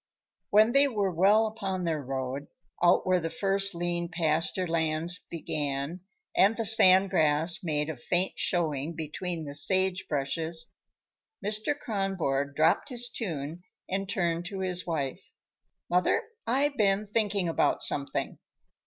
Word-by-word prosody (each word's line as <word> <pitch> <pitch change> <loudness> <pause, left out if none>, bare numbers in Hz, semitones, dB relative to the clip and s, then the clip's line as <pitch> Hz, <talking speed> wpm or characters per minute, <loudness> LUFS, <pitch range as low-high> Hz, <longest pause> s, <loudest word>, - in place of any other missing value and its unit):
When 215 +3 +5
they 275 +2 +4
were 205 -7 -1
well 200 +6 +4
upon 195 -4 -4
their 160 -3 -1
road, 135 +1 -4 0.4
out 175 - +4
where 185 -1 +2
the 165 -1 -3
first 195 +1 +1
lean 170 0 -2
pasture 165 +2 0
lands 165 +1 +3
began 150 0 -3 0.4
and 205 +4 +4
the 225 - -1
sand 190 -3 +6
grass 155 +3 +3
made 150 -3 -1
a 160 - -4
faint 175 +9 0
showing 160 -3 -1
between 160 +1 -5
the 140 - -7
sagebrushes, 165 -2 -1 0.7
Mr. 215 +8 0
Kronborg 180 - -2
dropped 160 - +2
his 245 -2 -3
tune 165 - -5 0.3
and 195 +1 -3
turned 175 -4 -1
to 190 +1 -5
his 180 -1 -1
wife. 140 -6 -3 0.7
"Mother, 180 +1 +1 0.2
I've 280 +3 +1
been 200 -1 +2
thinking 205 -3 0
about 165 - +1
something." 140 -1 -1
175 Hz, 135 wpm, -28 LUFS, 155-195 Hz, 0.7 s, sand